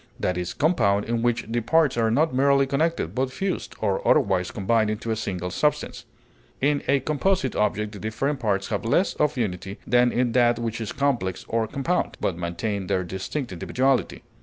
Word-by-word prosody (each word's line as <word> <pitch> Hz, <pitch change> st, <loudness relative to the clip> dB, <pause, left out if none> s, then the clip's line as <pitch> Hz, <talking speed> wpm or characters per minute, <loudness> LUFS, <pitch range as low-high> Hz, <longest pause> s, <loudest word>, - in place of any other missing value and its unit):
That 90 Hz, -, 0 dB
is 90 Hz, 0 st, -4 dB
compound 110 Hz, -, +2 dB
in 115 Hz, 0 st, -1 dB
which 120 Hz, 0 st, 0 dB
the 120 Hz, +1 st, -1 dB
parts 155 Hz, +3 st, +3 dB
are 115 Hz, -1 st, +2 dB
not 150 Hz, +6 st, +2 dB
merely 140 Hz, +1 st, +4 dB
connected, 140 Hz, -, 0 dB
but 130 Hz, +2 st, -1 dB
fused, 190 Hz, +7 st, -3 dB
or 100 Hz, -3 st, 0 dB
otherwise 90 Hz, -3 st, +3 dB
combined 110 Hz, +2 st, +1 dB
into 110 Hz, +2 st, -3 dB
a -, -, +1 dB
single 90 Hz, -4 st, -4 dB
substance. 150 Hz, +9 st, -1 dB, 0.5 s
In 145 Hz, +1 st, +2 dB
a 140 Hz, 0 st, +3 dB
composite 180 Hz, +7 st, 0 dB
object 105 Hz, 0 st, 0 dB
the 105 Hz, -, -9 dB
different 135 Hz, +7 st, -2 dB
parts 100 Hz, -4 st, -1 dB
have 105 Hz, 0 st, -2 dB
less 170 Hz, +12 st, +2 dB
of 150 Hz, -2 st, 0 dB
unity 95 Hz, -3 st, -3 dB
than 125 Hz, 0 st, +3 dB
in 125 Hz, -1 st, +1 dB
that 120 Hz, -1 st, +3 dB
which 115 Hz, -1 st, -3 dB
is 110 Hz, -, -4 dB
complex 125 Hz, -10 st, -1 dB
or 115 Hz, -1 st, 0 dB
compound, 140 Hz, +8 st, -1 dB
but 90 Hz, -, -1 dB
maintain 90 Hz, +3 st, -3 dB
their 90 Hz, 0 st, 0 dB
distinct 95 Hz, -, -4 dB
individuality. 125 Hz, +5 st, 0 dB
115 Hz, 185 wpm, -24 LUFS, 100-140 Hz, 0.5 s, merely